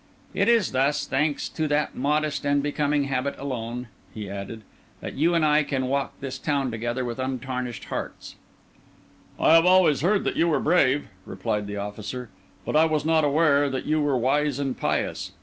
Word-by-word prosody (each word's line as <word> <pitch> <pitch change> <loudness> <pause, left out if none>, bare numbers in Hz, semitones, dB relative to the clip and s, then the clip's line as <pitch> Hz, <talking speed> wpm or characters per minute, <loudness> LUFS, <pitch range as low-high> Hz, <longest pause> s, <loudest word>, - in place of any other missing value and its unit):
It - - +2
is 230 -6 +3
thus, 140 +3 +1
thanks 145 +2 0
to 155 -1 -2
that 150 0 0
modest 150 +2 0
and 140 0 +1
becoming 145 0 0
habit 140 0 -2
alone," 125 -2 -5 0.2
he 105 0 -7
added, 100 +3 -7 0.4
"that - - -6
you 165 +5 +2
and 165 -2 +3
I 150 0 +4
can 135 -3 -2
walk 140 +2 -2
this 135 -1 -5
town 140 -4 -1
together 120 +3 -3
with 120 +1 -5
untarnished 130 -2 -4
hearts." - - -6 1.0
"I - - +5
had 165 +1 +6
always 180 -7 +5
heard 195 +5 +2
that - - -1
you 170 - +3
were 160 - +2
brave," 145 -4 +2 0.2
replied 105 +2 -3
the 105 0 -5
officer, 105 +4 -6 0.4
"but - - -2
I 155 +1 +6
was 155 -2 0
not 160 -1 +3
aware 145 -1 +3
that 130 -1 -4
you 155 0 +1
were 145 -3 +1
wise 140 +3 +1
and 135 -2 -2
pious. - - -2
140 Hz, 185 wpm, -25 LUFS, 125-150 Hz, 1.0 s, had